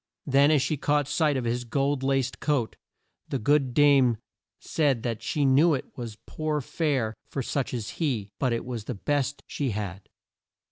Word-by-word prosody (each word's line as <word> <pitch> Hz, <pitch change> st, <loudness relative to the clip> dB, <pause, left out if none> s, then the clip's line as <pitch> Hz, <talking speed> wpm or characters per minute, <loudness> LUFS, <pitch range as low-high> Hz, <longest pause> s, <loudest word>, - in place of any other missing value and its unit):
Then 140 Hz, +1 st, +4 dB
as 150 Hz, -4 st, +4 dB
she 150 Hz, +2 st, -1 dB
caught 145 Hz, 0 st, +1 dB
sight 150 Hz, -3 st, +2 dB
of 125 Hz, -, -2 dB
his 120 Hz, +1 st, -1 dB
gold 140 Hz, +3 st, 0 dB
laced 135 Hz, -1 st, 0 dB
coat, 140 Hz, -7 st, 0 dB, 0.5 s
the -, -, 0 dB
good 135 Hz, +1 st, +2 dB
dame 135 Hz, -5 st, +5 dB, 0.4 s
said 140 Hz, -7 st, 0 dB
that 115 Hz, -3 st, -2 dB
she 145 Hz, -2 st, 0 dB
knew 145 Hz, +4 st, +5 dB
it 130 Hz, -, -7 dB
was 115 Hz, -5 st, -6 dB
poor 155 Hz, -1 st, -2 dB
fare 135 Hz, -5 st, -1 dB, 0.2 s
for 135 Hz, -, -3 dB
such 135 Hz, +2 st, -2 dB
as 115 Hz, -4 st, -4 dB
he, 115 Hz, -10 st, -1 dB
but 130 Hz, -3 st, +1 dB
it 115 Hz, -, -2 dB
was 120 Hz, -4 st, -5 dB
the 125 Hz, -, -4 dB
best 145 Hz, +5 st, -1 dB
she 140 Hz, -3 st, -2 dB
had. 100 Hz, -3 st, -5 dB
135 Hz, 180 wpm, -27 LUFS, 120-145 Hz, 0.5 s, dame